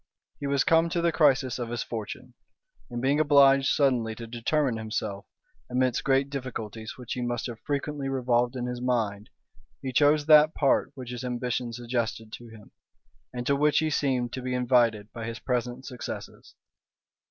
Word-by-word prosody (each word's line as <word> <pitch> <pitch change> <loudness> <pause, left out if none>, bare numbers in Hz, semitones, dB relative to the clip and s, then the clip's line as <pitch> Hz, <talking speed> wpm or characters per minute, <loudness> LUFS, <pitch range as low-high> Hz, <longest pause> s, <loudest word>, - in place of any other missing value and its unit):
He 140 - -3
was 140 -1 +2
come 165 -1 +3
to 170 - -1
the 170 0 +2
crisis 135 -5 +2
of 120 -1 -4
his 120 -1 -3
fortune; 110 -3 -7 0.6
and 120 0 -5
being 140 +3 +2
obliged 140 -2 +5
suddenly 125 -6 +2
to 115 - -8
determine 120 +2 0
himself, 110 -2 -4 0.4
amidst 125 -1 +1
great 135 0 +2
difficulties 115 -5 -6
which 125 -2 -6
he 125 - -4
must 120 -1 -2
have 120 -3 -6
frequently 145 -1 -3
revolved 125 -2 +1
in 125 -1 -3
his 125 0 -4
mind, 110 -3 -1 0.5
he 130 -1 -5
chose 145 +2 +4
that 155 0 +6
part 140 -2 +2
which 125 -2 -8
his 125 0 -6
ambition 125 -1 -2
suggested 115 -2 -3
to 120 - -9
him, 110 -2 -15 0.6
and 125 -1 -5
to 140 - +2
which 150 +1 +2
he 155 -1 +2
seemed 125 -5 0
to 130 - -4
be 125 0 -2
invited 120 -4 +2
by 115 -2 -6
his 115 0 -5
present 125 +1 -3
success. 125 -3 -6
125 Hz, 175 wpm, -27 LUFS, 120-140 Hz, 0.6 s, that